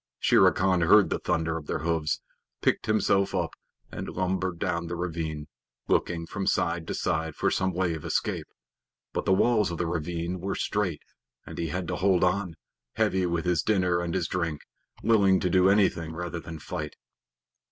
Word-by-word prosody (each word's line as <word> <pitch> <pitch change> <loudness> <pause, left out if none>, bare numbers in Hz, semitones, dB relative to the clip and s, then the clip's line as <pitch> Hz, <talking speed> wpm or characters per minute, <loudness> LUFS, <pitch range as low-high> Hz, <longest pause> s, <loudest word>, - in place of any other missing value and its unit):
Shere - - +5
Khan 90 -1 +1
heard 100 +5 +5
the - - 0
thunder 80 0 0
of 75 -2 -9
their - - -1
hoofs, 80 -2 0 0.4
picked - - +1
himself 100 -2 +2
up, - - 0 0.4
and - - -5
lumbered 95 -1 -1
down 85 0 -2
the 85 - -4
ravine, 80 -4 -4 0.4
looking 85 -1 0
from 95 +3 -4
side 85 -1 0
to - - -3
side 80 -1 -1
for - - +1
some 95 0 +1
way 90 -1 0
of 80 -2 -6
escape, - - -1 0.7
but - - -2
the - - +2
walls 105 0 +3
of 85 - -4
the 85 - -1
ravine 85 +2 -3
were 95 +2 -3
straight 100 -7 -1 0.4
and - - -8
he 85 - -1
had 90 +3 -3
to - - -2
hold 95 -1 +3
on, 90 -2 +1 0.4
heavy 95 -1 +1
with 85 0 -1
his 90 -3 +2
dinner 90 -4 +2
and 85 0 -2
his 90 -4 0
drink, 85 -4 -2 0.4
willing 100 -4 +4
to 90 - 0
do 95 +1 +5
anything 90 -5 +2
rather 90 0 -4
than 85 0 -8
fight. 75 0 -5
90 Hz, 185 wpm, -27 LUFS, 85-95 Hz, 0.7 s, Shere